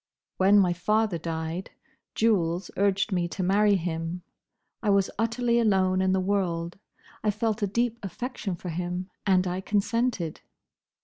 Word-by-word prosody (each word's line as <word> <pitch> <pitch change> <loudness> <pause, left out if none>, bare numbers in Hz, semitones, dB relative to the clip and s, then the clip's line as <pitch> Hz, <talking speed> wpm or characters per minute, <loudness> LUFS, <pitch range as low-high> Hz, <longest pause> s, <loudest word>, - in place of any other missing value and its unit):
When 195 +2 +5
my 185 -3 +4
father 210 +1 +1
died, 160 +2 -4 0.5
Jules 185 -5 +1
urged 200 +2 +1
me 175 -2 +1
to 185 +2 -4
marry 200 +2 +4
him. 170 0 -3 0.6
I 215 - 0
was 200 -1 +3
utterly 235 +1 +1
alone 190 -4 +3
in 190 0 +2
the 190 - +2
world; 185 -3 -1 0.4
I 215 - +2
felt 220 +1 -1
a 205 - +2
deep 235 +3 0
affection 210 -1 -4
for 180 - -7
him; 180 +2 -4 0.2
and 185 -1 +4
I 180 +1 -2
consented." 205 -4 -1
190 Hz, 145 wpm, -27 LUFS, 175-210 Hz, 0.6 s, When